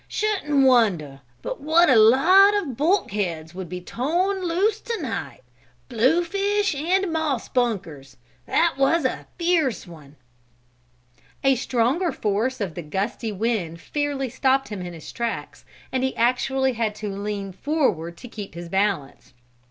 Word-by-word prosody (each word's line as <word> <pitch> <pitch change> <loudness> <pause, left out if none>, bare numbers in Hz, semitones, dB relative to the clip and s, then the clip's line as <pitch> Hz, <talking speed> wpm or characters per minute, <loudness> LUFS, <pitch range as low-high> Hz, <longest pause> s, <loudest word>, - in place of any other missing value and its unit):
"Shouldn't 300 -10 +1
wonder 180 - +2 0.2
but - - -5
what 325 +4 +4
a 260 - +5
lot 330 - +6
of 330 - -2
bulkheads 200 - -1
would 185 -2 -7
be 180 +1 -6
torn 350 - -1
loose 390 +6 +1
to 460 -2 -4
night. 225 - -5 0.5
Bluefish 390 - +1
and 345 +5 0
moss 305 -6 -1
bunkers! 175 - -2 0.3
That 330 -5 +1
was 280 +3 +3
a 255 - -2
fierce 335 -8 +1
one!" 150 -5 -14 1.3
A 270 0 +5
stronger 255 +8 0
force 220 +5 -1
of 195 -6 -3
the 175 - -6
gusty 195 +7 -3
wind 200 -6 -2
fairly 285 - -2
stopped 270 +1 +1
him 205 -3 -5
in 175 -1 -6
his 165 - -10
tracks, 235 -1 -5 0.3
and 260 0 -1
he 265 - -1
actually 260 +2 +1
had 220 -2 -2
to 215 0 -6
lean 200 0 -4
forward 185 - -1
to 245 - -10
keep 210 -6 -9
his 170 0 -7
balance. 190 -10 -2
250 Hz, 145 wpm, -23 LUFS, 195-320 Hz, 1.3 s, lot